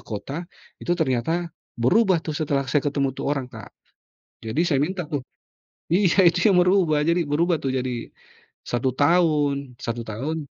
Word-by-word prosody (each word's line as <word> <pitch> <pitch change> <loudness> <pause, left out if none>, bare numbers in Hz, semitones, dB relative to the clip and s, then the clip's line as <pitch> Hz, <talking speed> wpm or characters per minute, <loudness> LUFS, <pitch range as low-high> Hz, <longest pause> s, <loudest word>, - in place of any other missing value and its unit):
kota, 140 - -6 0.3
itu 175 - -1
ternyata 160 +3 -1 0.2
berubah 180 - +3
tuh 155 - -3
setelah 145 -3 0
saya 145 - +3
ketemu 140 -2 -1
tuh 135 - -4
orang, 140 -2 -1
Kak. 110 -3 -10 0.8
Jadi 110 +9 0
saya 155 -6 +1
minta 180 +5 -1
tuh 145 - -1 0.7
iya 185 +2 +3
itu 175 +4 +3
yang 180 - +5
berubah 180 -4 +3
jadi 170 +3 +1
berubah 165 +4 +1
tuh 135 - -1
jadi 125 -2 -4 0.5
1 120 +1 -1
tahun, 145 -4 +2
1 115 0 -3
tahun. 145 +9 -4
150 Hz, 155 wpm, -23 LUFS, 135-175 Hz, 0.8 s, yang